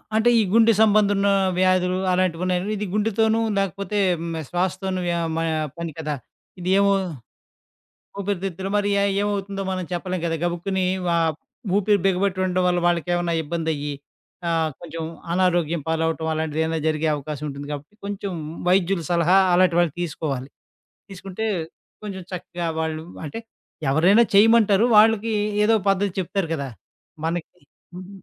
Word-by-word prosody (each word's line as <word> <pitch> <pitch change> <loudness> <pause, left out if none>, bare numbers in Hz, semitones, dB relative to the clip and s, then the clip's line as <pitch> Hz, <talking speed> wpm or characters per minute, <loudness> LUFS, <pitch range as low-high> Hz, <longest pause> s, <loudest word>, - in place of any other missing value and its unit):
అంటే 220 +2 +4
ఈ 220 - +4
గుండె 230 0 +6
సంబంధున్న 205 -2 +4 0.3
వ్యాధులు 185 0 +2
అలాంటివున్నాయంటె 180 +2 0
ఇది 210 - -3
గుండెతోను, 220 +1 +2 0.2
లేకపోతే 195 +1 -2 0.2
హ్మ్, 170 0 -4
ఆహ్, 155 - -6
శ్వాసతోను 185 +1 -1
వ - - +1 0.3
మ - - -1 0.4
పని 170 -1 -4
కదా! 150 -2 -2 0.4
ఇదేమో, 195 +3 +3 1.3
ఊపిరితిత్తులు 195 -1 -3
మరి 205 0 +1
అయి 200 - +2
ఏమవుతుందో 200 -1 -2
మనం 185 -1 -3
చెప్పలేం 180 +1 -2
కదా! 165 -1 0
గబుక్కుని 180 +2 -1 0.2
వా 170 - +2 0.6
ఊపిరి 205 0 +3
బిగబెట్టి 190 0 +1
ఉండడం 185 0 0
వల్ల 180 0 +2
వాళ్ళకేమన్నా 175 0 0
ఇబ్బందయ్యి, 150 -2 -2 0.6
ఆహ్, 160 -1 +1
కొంచెం 165 -1 -6 0.3
అనారోగ్యం 175 -3 +1
పాలవటం 160 0 0
అలాంటిదేదైనా 160 +1 -1
జరిగే 155 0 0
అవకాశం 150 +1 -6
ఉంటుంది 140 +1 -7
కాబట్టి, 145 +7 -7
కొంచెం 200 -1 -4 0.4
వైద్యుల 185 -1 +2
సలహా 175 +2 +4 0.2
అలాంటి 180 -1 +4
వాళ్ళు 170 -4 +2
తీసుకోవాలి. 145 -5 -3 0.6
తీసుకుంటే, 195 +3 -5 0.6
కొంచెం 195 -3 -6
చక్కగా 175 -1 -5
వాళ్ళు 160 0 -3 0.2
అంటే 150 - -6 0.5
ఎవరైనా 180 +10 +5
చేయమంటారు. 215 0 +5
వాళ్ళకి 220 +1 +4 0.3
ఏదో 225 +1 +4 0.2
పద్ధతి 195 -1 0
చెప్తారు 185 -1 -2
కదా! 140 -3 -4 0.6
మనకి 170 0 -3 0.4
హ్మ్, 185 0 -9
180 Hz, 130 wpm, -23 LUFS, 165-200 Hz, 1.3 s, గుండె